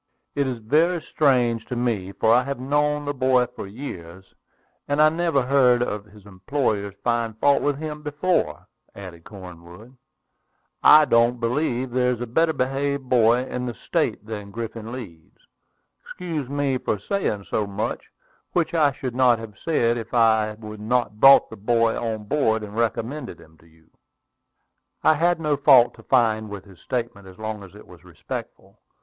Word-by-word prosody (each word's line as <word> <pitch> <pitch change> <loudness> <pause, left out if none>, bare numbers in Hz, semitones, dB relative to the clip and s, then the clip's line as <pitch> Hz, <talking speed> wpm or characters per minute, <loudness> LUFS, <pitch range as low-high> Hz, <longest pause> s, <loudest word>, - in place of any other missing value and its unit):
"It 140 -1 0
is 125 -2 -3
very 155 +10 +1
strange 125 -8 +1
to 125 - -4
me, 115 -6 -2
for 110 +3 +2
I 125 - +5
have 140 -2 -4
known 145 +2 0
the 145 - -2
boy 130 -2 +2
for 125 -4 -9
years, 95 -6 -9 0.5
and 145 +1 -1
I 155 0 +7
never 160 -4 0
heard 125 -2 +3
any - - -2
of 105 0 -6
his 105 -1 -18
employers 100 0 -2
find 115 -2 -1
fault 140 +2 +3
with 145 -1 0
him 150 0 -6
before," 150 +5 -1 0.3
added 90 -4 -11
Cornwood. 90 +4 -12 0.9
"I 155 0 +8
don't 120 -1 +2
believe 125 +1 -1
there 125 0 +1
is 120 - -7
a 120 - -3
better 160 +8 +1
behaved 135 0 -2
boy 120 0 +3
in 125 -1 -4
the 120 - -5
State 105 - -2
than 105 -2 -7
Griffin 115 +1 -7
Leeds. 95 -11 -10 0.7
Excuse 160 -7 -5
me 140 -2 -1
for 105 - -2
saying 105 - -2
so 105 +1 -2
much, 100 +2 -4 0.5
which 170 -1 0
I 150 -4 +3
should 130 -1 -5
not 125 -2 +4
have 115 -2 -9
said 120 -7 +1
if 115 - -7
I 110 -2 +4
had 105 -1 -9
not 115 -1 -1
brought 135 +3 +7
the 110 - -9
boy 115 +2 +1
on 110 -2 -3
board 110 -2 0
and 105 0 -9
recommended 115 +5 -3
him 80 0 -18
to 85 - -22
you." 80 0 -26 1.1
I 155 - +6
had 170 +3 +1
no 150 -2 0
fault 135 -4 +6
to - - -16
find 110 -4 +1
with 100 -1 -8
his 95 -4 -17
statement, 115 -6 -5
as 95 -1 -14
long 110 -1 -5
as 95 -3 -13
it - - -14
was - - -16
respectful. - - -9
120 Hz, 175 wpm, -23 LUFS, 105-140 Hz, 1.1 s, I